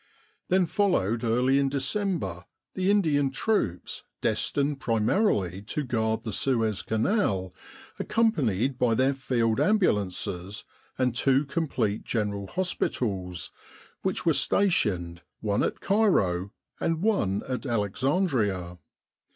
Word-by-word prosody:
Then 185 0 +3
followed 140 - +1
early 125 +4 +3
in 140 -1 +2
December 135 - -2 0.3
the 185 +1 0
Indian 155 -9 +3
troops 135 - -1 0.2
destined 140 0 0
primarily 110 - +1
to 130 +8 -3
guard 110 -3 -1
the 110 - -4
Suez 115 -4 0
Canal, 110 - 0 0.5
accom 225 -1 +2
panied 125 - 0
by 120 -2 +3
their 130 +3 +3
field 120 -4 0
ambulances 100 - 0 0.3
and 125 -2 +1
two 135 +3 +3
complete 135 -8 -1
General 100 -3 -2
Hospitals, 95 - -2 0.5
which - - -1
were - - +4
stationed 95 - +1 0.2
one 105 -1 0
at - - -1
Cairo 100 - +2 0.3
and 165 +1 -1
one 145 - +1
at 130 +1 -3
Alexandria. 105 - 0
120 Hz, 110 wpm, -27 LUFS, 100-160 Hz, 0.5 s, were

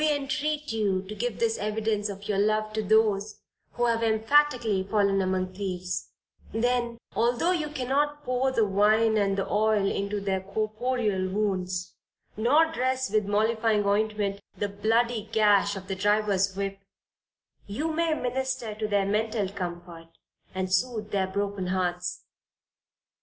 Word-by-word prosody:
We 310 - +4
entreat 295 +2 -2
you 200 -4 0
to 195 +2 -8
give 230 +1 -3
this 225 -1 0
evidence 210 0 -1
of 200 0 -7
your 200 -2 0
love 215 +1 +1
to 220 - 0
those 215 0 +2 0.3
who 240 - 0
have 230 -1 +1
emphatically 225 -1 +3
fallen 200 0 +1
among 185 0 -1
thieves, 185 -2 -4 0.4
then, 240 +1 0 0.2
although 240 +9 +2
you 315 -5 -1
cannot 290 +2 -1
pour 255 0 0
the 230 -4 +2
wine 215 +3 +3
and 200 -2 +1
the 195 - -1
oil 210 -1 +2
into 200 +1 -1
their 195 -1 -1
corporeal 215 0 -1
wounds, 185 -3 -2 0.4
nor 295 +9 +3
dress 260 -5 -1
with 210 -2 +1
mollifying 220 0 +2
ointment, 205 -1 0 0.2
the 205 - -1
bloody 220 +2 0
gash 205 -2 +4
of 190 -1 -8
the 195 - -2
drivers' 200 -1 +1
whip, 195 0 -3 0.9
you 300 +11 -2
may 325 0 +1
minister 255 -3 -2
to 215 0 -3
their 200 -2 +1
mental 215 0 0
comfort, 175 -3 -7 0.5
and 185 0 -2
soothe 215 +1 0
their 195 -2 +1
broken 200 -1 -2
hearts. 180 -1 -2
210 Hz, 145 wpm, -27 LUFS, 195-235 Hz, 0.9 s, We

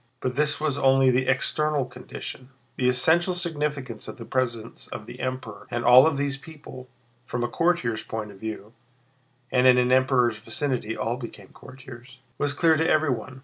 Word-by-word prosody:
But 125 -1 -3
this 150 +1 +1
was 150 -2 -1
only 135 -1 +4
the 130 +1 +1
external 150 +2 +1
condition; 125 +1 -9 0.3
the 125 -1 +2
essential 165 +8 +3
significance 150 - -2
of - - -8
the 115 - -9
presence 120 -3 -3
of 105 - -8
the 120 +2 -11
Emperor 130 -5 -5
and 120 0 -3
of - - -1
all 130 +5 +9
these 140 -2 -2
people, 145 -4 -12 0.4
from 120 0 -2
a - - +1
courtier's 125 -6 0
point 110 -2 -6
of 95 - -15
view 110 0 -7 0.8
(and 125 0 +4
in 125 -1 +7
an 125 0 +2
Emperor's 130 -3 +3
vicinity 115 0 -3
all 115 +2 -2
became 110 -6 -10
courtiers), 130 -1 -13 0.2
was 145 - 0
clear 160 +2 +3
to 160 +1 +1
everyone. 130 -4 0
130 Hz, 175 wpm, -25 LUFS, 120-145 Hz, 0.8 s, all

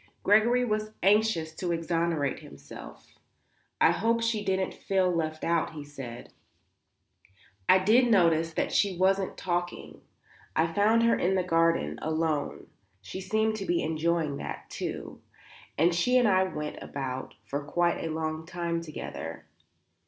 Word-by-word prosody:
Gregory 235 +5 +4
was 215 -1 -2
anxious 200 -5 +3
to 175 +2 -3
exonerate 165 -3 0
himself. 70 0 -13 0.6
"I - - +6
hope 230 +2 +1
she 225 -2 0
didn't 190 -1 0
feel 190 -2 +1
left 155 -2 -2
out;" 165 -1 0
he 150 -2 -7
said. 135 -5 -9 1.4
"I 185 - +8
did 225 +6 +4
notice 165 -6 +3
that - - 0
she 195 -3 +2
wasn't 190 +1 +1
talking. 175 -1 -3 0.5
I 165 +1 +1
found 220 +4 +4
her 230 0 +4
in 190 +2 +1
the 185 - +1
garden, 165 - +1
alone 155 -2 -1 0.3
she 185 - -7
seemed 220 +3 0
to 195 - -5
be 175 - +1
enjoying 160 -2 0
that, - - -7
too - - -5 0.6
and 170 +3 +4
she 250 +9 +3
and 245 -2 +4
I 190 -2 +4
went 150 -5 -5
about 130 -2 -5
for 140 +1 -3
quite 170 +3 0
a 165 - -2
long 160 0 -3
time 170 -2 -2
together." 80 - -7
170 Hz, 145 wpm, -28 LUFS, 155-195 Hz, 1.4 s, I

